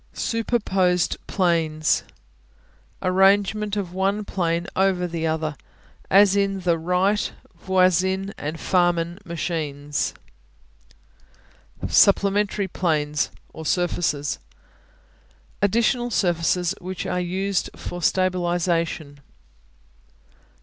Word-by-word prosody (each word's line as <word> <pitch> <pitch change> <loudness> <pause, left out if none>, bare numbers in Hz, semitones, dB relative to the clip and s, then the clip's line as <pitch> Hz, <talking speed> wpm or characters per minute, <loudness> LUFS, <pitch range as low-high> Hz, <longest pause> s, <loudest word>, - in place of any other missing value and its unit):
Superposed 195 -6 0
Planes 165 -5 +1 1.0
Arrangement 200 +3 +3
of 185 -3 -3
one 195 +3 0
plane 170 -3 -1
over 190 -2 +2
the 165 -2 -2
other, 160 -1 -2 0.5
as 200 0 +6
in 195 -1 0
the 175 -2 +2
Wright, 180 +5 +1 0.2
Voisin 190 +2 +1
and 155 +2 -5
Farman 175 -1 +1
machines. 150 -4 -3 1.7
Supplementary 200 0 +3
Planes 150 -5 0 0.2
(or 160 - -8
surfaces) 160 -4 0 1.2
Additional 235 +4 +2
surfaces 175 -2 +1
which 185 0 -5
are 180 - -1
used 185 0 -1
for 175 - -6
stabilization. 175 -5 0
180 Hz, 80 wpm, -23 LUFS, 165-195 Hz, 1.7 s, as